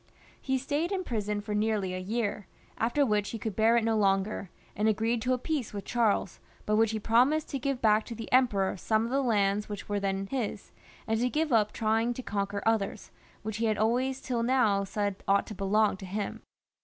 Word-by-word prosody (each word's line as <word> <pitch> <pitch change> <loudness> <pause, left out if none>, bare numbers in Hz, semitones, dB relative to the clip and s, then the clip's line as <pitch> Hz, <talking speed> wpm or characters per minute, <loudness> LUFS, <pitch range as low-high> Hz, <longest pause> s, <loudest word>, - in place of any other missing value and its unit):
He 265 -1 0
stayed 290 +7 -1
in 380 -2 -1
prison 210 - -2
for 210 0 -5
nearly 210 -3 0
a 185 - -3
year, 205 0 -2 0.3
after 240 +6 +2
which 210 -3 +1
he 230 - -4
could 220 -2 -4
bear 225 +2 +4
it 235 - +2
no 225 0 +1
longer, 195 -1 +1 0.3
and 210 +2 +1
agreed 225 +2 +1
to 255 +2 +1
a - - +1
peace 270 -3 -3
with 200 - -5
Charles, 220 -5 0 0.3
by 210 - 0
which 220 +1 +4
he 220 - -2
promised 250 +8 +2
to 275 - -3
give 270 -1 -2
back 215 0 +4
to 235 - -7
the 225 0 -7
Emperor 225 -7 +3
some 220 +4 +1
of 235 - -4
the 275 +1 +2
lands 210 -4 +1
which 205 -1 -6
were 205 -1 -1
then 195 0 -1
his, 220 -2 -4 0.3
and 220 0 0
to 250 +1 +1
give 305 0 0
up 210 -2 +3
trying 225 +2 0
to 255 - -6
conquer 200 -1 -2
others, 220 -2 0 0.3
which 215 0 -4
he 230 - 0
had 215 -1 +1
always 255 +5 +1
till 245 -3 -2
now 230 -5 +2
said 200 0 -3
ought 200 0 +3
to - - -7
belong 205 +2 +2
to 190 - -9
him. 200 +2 -4
220 Hz, 215 wpm, -29 LUFS, 205-240 Hz, 0.3 s, bear